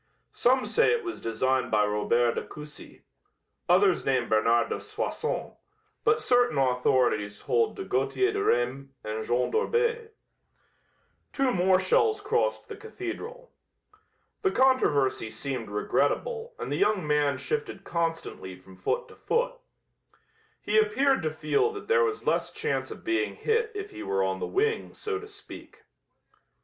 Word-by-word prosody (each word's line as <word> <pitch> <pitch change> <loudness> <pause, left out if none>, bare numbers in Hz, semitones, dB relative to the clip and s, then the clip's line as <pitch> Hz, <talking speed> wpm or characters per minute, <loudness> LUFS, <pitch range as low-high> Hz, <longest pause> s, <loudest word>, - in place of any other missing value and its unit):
Some 255 +1 +2
say 470 0 +3
it 475 - -1
was 345 -1 -6
designed 125 +2 0
by 105 -1 +3
Robert 115 +3 +1
de - - -2
Coucy; 150 -1 -12 0.7
others 185 +1 +4
name 130 -3 +1
Bernard 115 +2 +3
de - - -3
Soissons, 430 +3 -3 0.5
but 445 0 +3
certain 245 - +2
authorities 125 -5 +1
hold 455 -1 +1
to 390 - -5
Gauthier 385 +1 +1
de 410 0 -1
Reims 130 +3 0
and 110 +1 -4
Jean 120 +2 0
d'Orbais." 465 0 0 1.2
Two 270 -2 +1
more 185 -2 +3
shells 425 - +2
crossed 460 +4 0
the 430 - -7
cathedral. 445 +4 -7 0.9
The 390 - +3
controversy 150 - +2
seemed 115 +1 -4
regrettable 465 - -1
and - - -5
the 145 - 0
young 200 -2 +2
man 145 -2 +2
shifted 445 - -4
constantly 165 - -3
from 95 0 -16
foot 485 - -1
to - - -14
foot. - - 0 1.1
He 440 - +3
appeared 280 - +2
to 155 -2 -1
feel 155 - +1
that 410 - -8
there 470 0 +4
was 430 -2 -2
less - - +1
chance 450 +1 -2
of - - -9
being 355 +4 0
hit 450 0 0
if 410 0 -5
he - - -9
were 95 0 0
on 95 0 -1
the - - -3
wing, 445 +3 -1
so 425 -2 -3
to 425 - -10
speak. 415 - -13
245 Hz, 150 wpm, -27 LUFS, -, 1.2 s, others